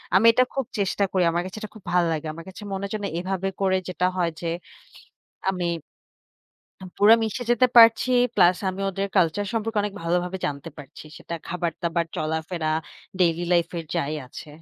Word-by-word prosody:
আমি 195 +4 +5
এটা 255 +2 +4
খুব 270 -2 -1
চেষ্টা 200 0 0
করি, 185 -2 +2
আমার 170 +1 0
কাছে 185 +3 -7
এটা 215 - -6
খুব 215 - -13
ভালো 175 -1 +3
লাগে। 155 0 -4
আমার 165 +1 -10
কাছে 185 - -11
মনে 195 0 -3
হচ্ছে 210 +2 -4
না - - 0
এভাবে 190 +1 -2
করে 190 -1 +3
যেটা 180 0 -1
হয় 175 -2 +2
যে, 170 - -3 1.0
আমি 180 -2 -3 1.2
আ - - -7
পুরা 210 +2 +8
মিশে 225 +3 -2
যেতে 240 +1 +5
পারছি, 230 +2 +7 0.2
প্লাস 175 -2 +5
আমি 185 +1 -7
ওদের 195 +1 -3
কালচার 185 +3 +2
সম্পর্কে 225 -1 -1
অনেক 205 -1 -3
ভালোভাবে 180 +2 -1
জানতে 140 +2 -5
পারছি। 140 +1 -11
সেটা 170 - -6
খাবার-দাবার, 170 -1 -2
চলাফেরা 160 +1 -2 0.5
daily 170 -1 +2
life 170 -1 +2
এর 165 - -5
যাই 155 -2 -1
আছে। 140 +4 -10
180 Hz, 180 wpm, -24 LUFS, 170-200 Hz, 1.2 s, পুরা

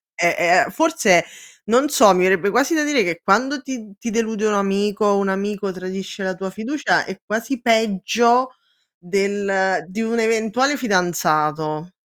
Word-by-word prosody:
è 170 +1 +3
è - - -8
forse, 310 - +3 0.4
non 250 +7 +2
so, 230 -9 +6
mi 180 - +2
verrebbe 195 +2 +2
quasi 260 +9 +1
da 305 - +1
dire 295 -7 +1
che 170 -1 -3
quando 255 +8 +1
ti 240 -7 -8
ti 235 - -4
delude 220 -1 -2
un 210 - 0
amico, 200 +1 -1
o 200 -1 +3
un 200 -1 -1
amico 200 +1 -3
tradisce 190 +2 -7
la 185 0 -2
tua 190 +1 -6
fiducia, 250 +9 -1
è 190 - -8
quasi 230 +4 -3
peggio 235 +2 +1 0.4
del 195 0 -1
di 200 +4 -6
un 230 +1 -2
eventuale 225 +5 +1
fidanzato. 160 - -1
205 Hz, 160 wpm, -20 LUFS, 190-235 Hz, 0.4 s, so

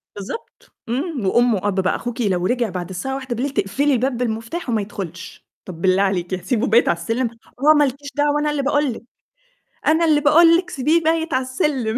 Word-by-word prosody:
بالضبط. 205 - -9 0.2
إمم، 270 - -2
وأم 240 +3 +3
وأب 195 0 -1
بقى، 185 - +1
"أخوكِ 240 0 -5
لو 185 -4 0
رجع 240 0 0
بعد 180 -1 -5
الساعة 265 +9 -4
01:00 260 0 -3
تقفلي 280 +7 +1
الباب 250 0 0
بالمفتاح 235 +6 -3
وما 220 -3 +1
يدخُلش." 180 -4 -8 0.2
"طَب 170 -3 -9
بالله 190 +1 +3
عليكِ 185 -2 -1
هاسيبه 210 +7 -1
بايت 230 +2 +4
على 170 - +1
السلم!" 225 +8 -1 0.3
"آه 305 +3 +6
ما 295 - +5
لكيش 280 +1 -3
دعوة 295 0 +2
أنا 300 0 0
اللي 290 -1 -1
باقول 290 -2 +1
لِك، - - -11 0.8
أنا 320 +2 +4
اللي 300 -2 +3
باقول 330 +3 +6
لِك 360 0 -4
سيبيه 310 +4 +1
بايت 320 0 0
علي 260 - +2
السِلِّم." 260 -4 -1
250 Hz, 195 wpm, -20 LUFS, 200-295 Hz, 0.8 s, آه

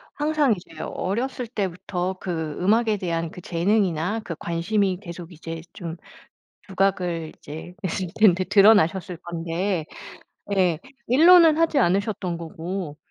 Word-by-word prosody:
항상 295 -4 +2
이제 165 -3 -13
어렸을 240 +5 -3
때부터 185 -3 -3
그 160 -4 -3
음악에 215 +3 +2
대한 165 -3 -2
그 180 - -10
재능이나 180 +2 0
그 165 - -5
관심이 185 +3 0
계속 175 -2 -9
이제 165 0 -7
좀 170 -2 -6 0.7
부각을 180 -4 0
이제 160 +4 -9
했을 185 +1 -2
텐데. 190 -4 +4
드러나셨을 195 -3 +4
건데, 170 0 -2 0.6
네. 185 -5 +1 0.3
일로는 325 +4 +7
하지 325 -3 +3
않으셨던 190 -3 0
거고. 165 -1 -6
185 Hz, 265 characters per minute, -24 LUFS, 170-210 Hz, 0.7 s, 일로는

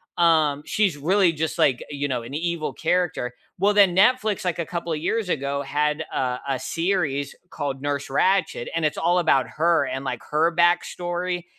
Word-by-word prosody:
um, 155 -4 +3
she's 200 -7 +1
really 175 +4 +2
just 160 0 -3
like, 130 -3 +2
you 145 0 -3
know, 125 -3 -2
an 125 +5 -8
evil 170 -1 -2
character. 165 -7 -1 0.2
Well, 200 +3 +3
then 195 -4 +5
Netflix, 215 -1 +3
like 175 -1 -1
a 170 - -1
couple 170 -1 -3
of 150 - -3
years 210 +4 -1
ago, 140 -2 -1
had 150 +3 -1
a 125 -1 -1
a 135 - -1
series 165 -6 -1 0.2
called 135 -2 -4
Nurse 145 -1 -2
Ratchet, 185 -4 +1
and 165 -2 0
it's 150 - -1
all 175 +2 +2
about 150 -6 +3
her 165 +1 +3
and 135 +1 -4
like 120 -3 -3
her 165 +3 +1
backstory 175 0 0
165 Hz, 180 wpm, -23 LUFS, 140-175 Hz, 0.2 s, then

